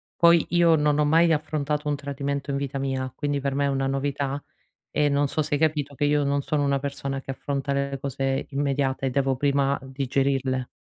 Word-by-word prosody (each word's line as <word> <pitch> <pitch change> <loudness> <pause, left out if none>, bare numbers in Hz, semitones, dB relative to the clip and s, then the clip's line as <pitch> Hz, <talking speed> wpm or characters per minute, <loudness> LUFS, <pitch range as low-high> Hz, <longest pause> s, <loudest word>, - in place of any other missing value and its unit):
poi 170 -1 +5
io 170 -1 +4
non 150 -1 +2
ho 150 - +3
mai 165 +3 +4
affrontato 150 -1 -1
un 145 - +1
tradimento 140 0 -4
in 140 - 0
vita 140 0 -3
mia, 130 -1 -2
quindi 145 -1 -1
per 140 0 -2
me 140 0 +1
è - - +2
una 135 -1 0
novità 140 +1 -2 0.5
e 150 -1 +2
non 145 0 +2
so 155 - -1
se 145 - -1
hai 145 - -2
capito 150 -3 0
che 145 - 0
io 145 0 +2
non 140 0 +1
sono 150 0 0
una 140 -1 +2
persona 140 -1 -4
che 135 - -6
affronta 140 +1 -3
le 140 0 -1
cose 135 0 -2
immediate, 135 -1 0
devo 135 0 +1
prima 140 +1 +1
digerirle. 135 -1 -1
140 Hz, 205 wpm, -25 LUFS, 135-145 Hz, 0.5 s, poi